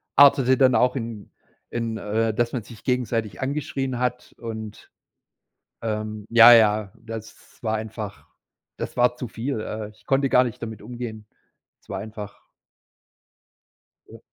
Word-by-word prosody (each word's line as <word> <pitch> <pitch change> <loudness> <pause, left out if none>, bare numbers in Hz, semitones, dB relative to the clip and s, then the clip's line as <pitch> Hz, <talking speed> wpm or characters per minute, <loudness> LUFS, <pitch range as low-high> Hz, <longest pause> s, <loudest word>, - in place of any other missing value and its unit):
artete 135 -2 +6
dann 130 -2 +5
auch 125 +1 +3
in 115 -4 -6 0.4
in, 115 -1 -3
äh 110 +1 0
dass 120 +2 0
man 125 -4 -2
sich 110 +1 -13
gegenseitig 115 -6 -1
angeschrien 135 -2 -2
hat 125 0 -2
und, 110 -2 -8 0.9
ähm 110 -1 -3
ja 120 +1 +10
ja, 105 -3 +4
das 110 -1 -10
war 110 -1 0
einfach 110 -2 -6 0.5
das - - -5
war 125 0 +4
zu 125 - -4
viel. 115 +2 -3
Äh, 110 -1 -5
ich 110 - -25
konnte 135 0 +2
gar 125 - +6
nicht 120 - -6
damit 110 -2 -6
umgehen. 115 -1 -7 0.6
Es - - -30
war 95 - -3
einfach 105 0 -8 1.6
Ja. - - -13
115 Hz, 140 wpm, -24 LUFS, 110-125 Hz, 1.6 s, ja